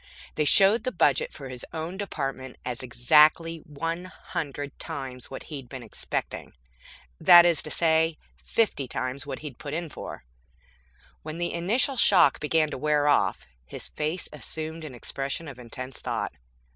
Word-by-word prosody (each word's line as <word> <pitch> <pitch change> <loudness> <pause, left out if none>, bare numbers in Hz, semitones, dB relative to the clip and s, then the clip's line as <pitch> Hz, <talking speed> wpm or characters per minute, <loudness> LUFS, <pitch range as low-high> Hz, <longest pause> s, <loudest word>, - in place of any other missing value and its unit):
They 150 - 0
showed 195 +8 +6
the 255 - -1
budget 485 - +2
for - - -9
his 125 -1 -6
own 160 +3 -4
department 135 -9 -4
as 125 0 -3
exactly 150 +6 +4
one 165 +4 -4
hundred 145 -5 -6
times 125 -3 -6
what 135 - -7
he'd 135 -5 -8
been 130 -3 -7
expecting. 110 - -4 0.7
That 175 0 +9
is 170 -2 +4
to - - -4
say, 160 0 +3 0.2
fifty 210 - 0
times 130 +3 -4
what 135 -2 -5
he'd 150 -5 -8
put 145 0 -5
in 170 -1 -3
for. - - -8 1.0
When 155 +1 -7
the 175 0 -2
initial 225 +10 +1
shock 185 -10 +6
began 155 0 +1
to - - -5
wear 150 0 +2
off, 145 - +2 0.2
his 60 - -6
face 155 +4 -2
assumed 160 +1 -5
an 135 -5 -8
expression 135 +6 -4
of 135 -4 -9
intense 130 +2 -8
thought. - - -3
150 Hz, 160 wpm, -26 LUFS, 135-165 Hz, 1.0 s, That